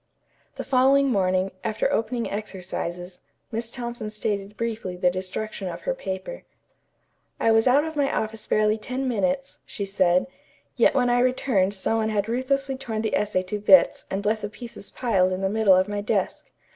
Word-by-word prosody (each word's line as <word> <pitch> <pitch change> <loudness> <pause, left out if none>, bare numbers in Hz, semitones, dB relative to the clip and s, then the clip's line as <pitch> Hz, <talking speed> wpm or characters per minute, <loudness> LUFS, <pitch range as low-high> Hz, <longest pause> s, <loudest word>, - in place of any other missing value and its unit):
The - - -5
following 270 +1 +4
morning, 185 -3 +1
after 220 -1 0
opening 230 +1 -1
exercises, 180 -3 -5 0.3
Miss 230 0 -3
Thompson 240 -2 -5
stated 210 -1 -3
briefly 220 -6 -3
the 180 0 +3
destruction 185 +2 -4
of 175 - -6
her - - -1
paper. 190 - -6 1.0
"I 225 - +3
was 225 +2 +4
out 275 +4 +5
of 320 -1 -5
my 285 -2 +1
office 220 0 -3
barely 215 +1 +2
ten 255 +4 -3
minutes," 270 +4 -1
she 200 - -5
said, 185 -2 +2 0.5
"yet - - +4
when 245 -2 +3
I 245 - +3
returned 245 -6 +1
some 220 +3 0
one 220 -1 0
had 210 -1 0
ruthlessly 265 +3 -1
torn 225 -4 -4
the 220 - 0
essay 205 -3 0
to 205 +3 -4
bits 195 -3 +5
and 195 +2 -3
left 215 +1 +1
the 205 - -4
pieces 215 -1 -7
piled 195 -7 +1
in 185 - -3
the 190 - +1
middle 210 -2 +4
of 185 +1 +3
my 205 0 -3
desk. 205 - -2
215 Hz, 180 wpm, -25 LUFS, 195-245 Hz, 1.0 s, out